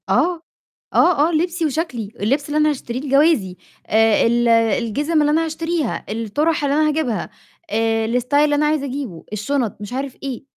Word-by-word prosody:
آه. 350 -2 +1 0.5
آه، 315 -4 +4
آه - - -2
لِبسي 335 +1 0
وشَكلي، 270 - -3
اللِبس 270 +8 0
اللي 295 - -1
أنا 305 0 +4
هاشتريه 255 -4 -4
لجوازي 275 - +2 0.3
آآ 220 0 +3
ال 240 +1 +2
الجزم 230 +7 +2
اللي 295 0 +2
أنا 325 +2 +2
هاشتريها، 325 -3 -2
الطُّرح 290 +9 -1
اللي 285 0 +1
أنا 305 0 +3
هاجيبها 290 -8 -2 0.4
آآ 225 0 +1
الstyle 250 +4 -8
اللي 290 0 +4
أنا 300 +1 +2
عايزة 300 -2 0
أجيبه، 255 - -6
الشُنط، 230 +1 -2
مش 205 +3 -7
عارف 270 0 -4
إيه. 265 -4 -5
280 Hz, 170 wpm, -20 LUFS, 230-305 Hz, 0.5 s, آه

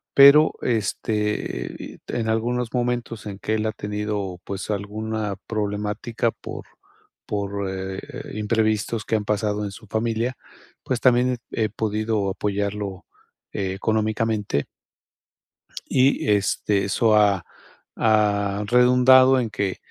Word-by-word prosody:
Pero, 140 +3 +8
este, 105 - -1
y - - -9
te - - -3
en 110 -1 -1
algunos 120 +1 -1
momentos 120 -2 -2
en 100 -1 -7
que 110 - -1
él 110 - -1
ha 110 - -2
tenido, 105 -3 -3
pues, 100 +1 -5
alguna 105 0 -3
problemática 105 +2 -2
por - - -9 0.6
por, 100 -1 -2
eh, 95 0 -4 0.4
imprevistos 110 0 0
que - - 0
han 105 -1 -1
pasado 105 0 0
en 100 - -4
su 110 +2 -13
familia, 115 +3 -1 0.5
pues 125 -2 -1
también 125 0 +3
he 110 -1 0
podido 110 -1 -1
apoyarlo 100 -1 -3 0.5
económicamente. 105 -3 -1 1.2
Y 130 -4 +2
este, 100 0 +1
eso 110 +3 +2
ha 100 -4 +3 0.5
ha 105 -2 +2
redundado 125 +2 +6
en 115 - -2
que, 100 -3 -2
105 Hz, 120 wpm, -23 LUFS, 100-115 Hz, 1.2 s, Pero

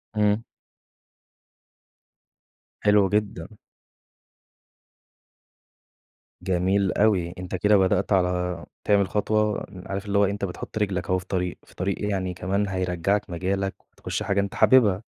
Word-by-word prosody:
امم. 105 +1 +2 2.4
حلو 105 -2 +4
جدًا. 105 -2 -2 2.8
جميل 95 +1 +1
أوي، 95 -5 +2
أنت 90 +1 -5
كده 105 +3 +4
بدأت 95 +1 +1
على 90 -3 0 0.2
تعمل 100 -2 +3
خطوة 105 0 0
إن 90 -2 -11
عارف 95 +1 -4
اللي 100 0 0
هو 100 - +5
إيه، 100 - 0
أنت 100 -1 -3
بتحُط 90 +3 -7
رِجلك 95 -5 -1
أهو 95 - +3
في 90 - -11
الطريق، 90 -1 -2
في - - -21
طريق 95 +1 -2
إيه، 105 - -2
يعني 95 -2 -2
كمان 100 +3 -1
هيرجّعك 95 +2 -1
مجالك 95 +3 -2 0.2
وتخُش - - -4
حاجة 100 0 0
أنت 100 0 -2
حاببها، 110 -6 +4
100 Hz, 130 wpm, -25 LUFS, 90-105 Hz, 2.8 s, هو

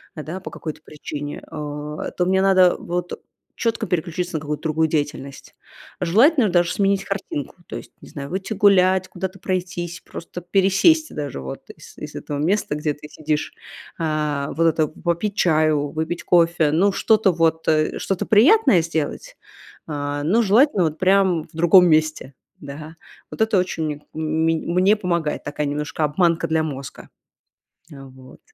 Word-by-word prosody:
да, 160 +3 -6
по 190 - -9
какой-то 155 -1 -7
причине, 145 -1 -7
а 150 0 -5
то 180 - -1
мне 190 0 +2
надо 185 -2 +5
вот 175 0 -4 0.4
четко 230 -1 -1
переключиться 175 0 -2
на - - 0
какую-то 150 0 -5
другую 160 0 +1
деятельность. 145 -3 -4 0.5
Желательно 225 - +4
даже 175 -1 +2
сменить 195 -1 +1
картинку. 195 -8 -5
То - - -7
есть, - - -11
не - - -13
знаю, 140 -1 -7
выйти 190 +4 -4
гулять, 190 -2 +4
куда-то 190 +1 -5
пройтись, 180 -2 -4
просто 180 +1 -9
пересесть 195 - +3
даже 145 - -4
вот 65 0 -8
из - - -16
из - - -8
этого 145 -1 -5
места, 180 +3 0
где 150 0 -1
ты 150 +1 -12
сидишь, 155 -1 -3 0.5
а, 150 -3 -1
вот 165 - +1
это, 155 -1 +2
попить 170 +6 -3
чаю, 155 -5 +2
выпить 160 +3 -4
кофе, 170 -3 +3
ну, 185 +6 +3
что-то 215 -1 +3
вот, 160 -1 0
э, 155 -1 +1
что-то 195 -2 -2
приятное 225 - +5
сделать, 165 - -4 0.5
а, 145 -1 -3
но 200 +10 +3
желательно 220 0 +4
вот 155 0 -2
прям 185 -3 +3
в - - -19
другом 175 +3 +6
месте, 155 -3 +1 0.3
да. 150 +3 -9 0.4
Вот - - -6
это 220 -2 +3
очень 160 -5 -3
мн 160 - -5 0.3
мень 165 -1 0
мне 185 +4 +4
помогает, 170 -6 -2
такая 145 0 -3
немножко 150 +2 -3
обманка 165 +2 +1
для 160 0 +1
мозга. 140 -3 -7 0.8
А 135 -1 -11
вот. 130 0 -15
165 Hz, 160 wpm, -21 LUFS, 150-190 Hz, 0.8 s, другом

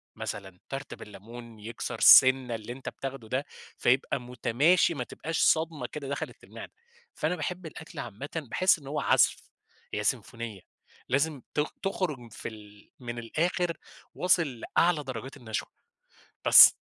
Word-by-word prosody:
مثلًا 95 -3 -6
تارت 135 +1 -5
بالليمون، 115 +2 -11
يكسَر 115 +1 -5
سِنَّة 130 -2 +8
اللي 115 +2 -6
أنتَ 135 - -6
بتاخُده 135 -4 -7
ده، 135 +3 -1 0.3
فيبقى 130 +2 +2
متماشي 125 +8 +2
ما 125 -5 -3
تبقاش 165 +6 -4
صدمة 160 -1 +2
كده 145 -3 -7
دخَلِّت 140 - -5
المعدة. - - -10 0.4
فأنا 160 +4 0
باحِب 180 +2 -4
الأكل 160 0 -9
عامةً، 120 +5 -6
باحِس 160 +4 +2
إن 140 - -13
هو 150 - -2
عزف - - +4 0.6
هي - - -1
سيمفونية، 115 -5 -3 0.5
لازم 140 +1 +1
ت 150 - +3 0.2
تخرُج 150 - -3
في - - -7
ال 105 -2 -15
من 120 -1 -5
الآخِر 170 +8 -1 0.4
واصِل 170 -9 +2 0.2
لأعلى 165 -3 +4
درجات 130 +1 -7
النشوة، 110 -4 -4 0.8
بس. - - +10
135 Hz, 140 wpm, -28 LUFS, 115-155 Hz, 0.8 s, بس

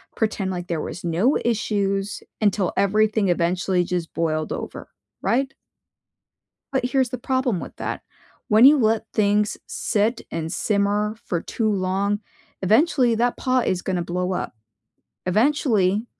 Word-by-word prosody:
pretend 210 -4 -1
like 175 -1 -5
there 165 -3 -2
was 180 - -6
no 185 - +2
issues, 200 -3 -1 0.2
until 200 -3 +1
everything 210 +1 +2
eventually 180 +1 +1
just 175 -2 -3
boiled 155 -1 -1
over," - - -7 0.3
right? 270 +2 0 1.2
But 265 -2 0
here's 260 -2 +1
the 255 - -4
problem 260 -6 0
with - - -9
that. - - -4 0.5
When 215 +3 +6
you 290 +2 +8
let 220 -2 +2
things 210 -1 +2
sit 215 +3 0
and 165 0 -4
simmer 205 +2 0
for 175 - -2
too 220 +4 -1
long, 200 +1 0 0.4
eventually 245 - +3
that 240 +2 +1
pot 255 -2 +1
is 180 -1 0
gonna 180 -2 -1
blow 180 +2 -2
up. 180 - -3 0.7
Eventually, 215 -2 +2
205 Hz, 135 wpm, -23 LUFS, 185-230 Hz, 1.2 s, you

